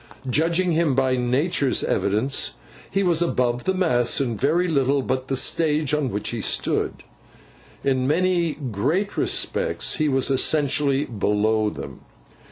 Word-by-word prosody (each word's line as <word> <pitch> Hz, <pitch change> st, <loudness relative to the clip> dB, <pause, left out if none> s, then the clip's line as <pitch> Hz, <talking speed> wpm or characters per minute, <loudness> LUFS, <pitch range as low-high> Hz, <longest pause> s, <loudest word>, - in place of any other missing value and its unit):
Judging 170 Hz, +7 st, +1 dB
him 160 Hz, -4 st, +1 dB
by 130 Hz, -1 st, +2 dB
Nature's 130 Hz, +3 st, 0 dB
evidence, 110 Hz, +7 st, 0 dB, 0.4 s
he 195 Hz, +1 st, 0 dB
was 175 Hz, -3 st, +1 dB
above 125 Hz, -7 st, 0 dB
the 190 Hz, -, +1 dB
mass 125 Hz, -10 st, +1 dB
in 125 Hz, -5 st, -1 dB
very 160 Hz, -, +1 dB
little 140 Hz, -3 st, +1 dB
but 130 Hz, 0 st, -2 dB
the 135 Hz, -, -1 dB
stage 150 Hz, 0 st, +1 dB
on 150 Hz, -3 st, 0 dB
which 105 Hz, -1 st, -3 dB
he 115 Hz, -2 st, -4 dB
stood. -, -, 0 dB, 0.8 s
In 130 Hz, -2 st, +1 dB
many 170 Hz, +1 st, +1 dB
great 145 Hz, -, -2 dB
respects -, -, -1 dB
he 155 Hz, -1 st, +1 dB
was 135 Hz, 0 st, +1 dB
essentially 145 Hz, 0 st, +2 dB
below 110 Hz, -1 st, 0 dB
them. -, -, -9 dB
140 Hz, 140 wpm, -23 LUFS, 125-165 Hz, 0.8 s, by